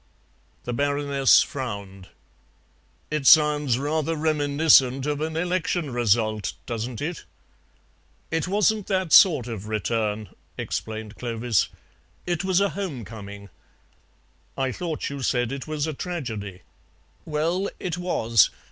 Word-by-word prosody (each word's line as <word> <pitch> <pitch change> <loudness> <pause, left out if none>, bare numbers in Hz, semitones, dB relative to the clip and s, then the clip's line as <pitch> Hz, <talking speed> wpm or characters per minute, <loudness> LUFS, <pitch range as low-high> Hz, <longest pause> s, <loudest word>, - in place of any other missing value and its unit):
The 120 - -4
Baroness 140 0 +3
frowned. 100 -8 -6 1.0
"It 150 -3 0
sounds 150 -5 +5
rather 155 +3 -1
reminiscent 145 -3 +3
of 150 0 -2
an 160 0 -2
election 175 -3 -1
result, 110 -3 +1
doesn't 115 +1 -4
it?" 170 +3 -4 1.1
"It 160 +2 -1
wasn't 210 +1 +1
that 185 -4 0
sort 155 - +7
of 110 -4 -6
return," 110 -1 -2 0.3
explained 110 -1 -5
Clovis; 115 -2 0 0.6
"it 175 0 -1
was 190 -1 +2
a 200 0 +2
home 170 - -5
coming." 100 -2 -10 1.1
"I 135 -1 0
thought 160 -1 -4
you 140 -1 -6
said 120 -1 0
it 135 +1 -6
was 155 -1 -2
a 160 - -3
tragedy." 110 - -5 0.6
"Well, 165 +5 -1
it 175 -1 -3
was. 115 - +3
140 Hz, 120 wpm, -24 LUFS, 115-160 Hz, 1.1 s, sort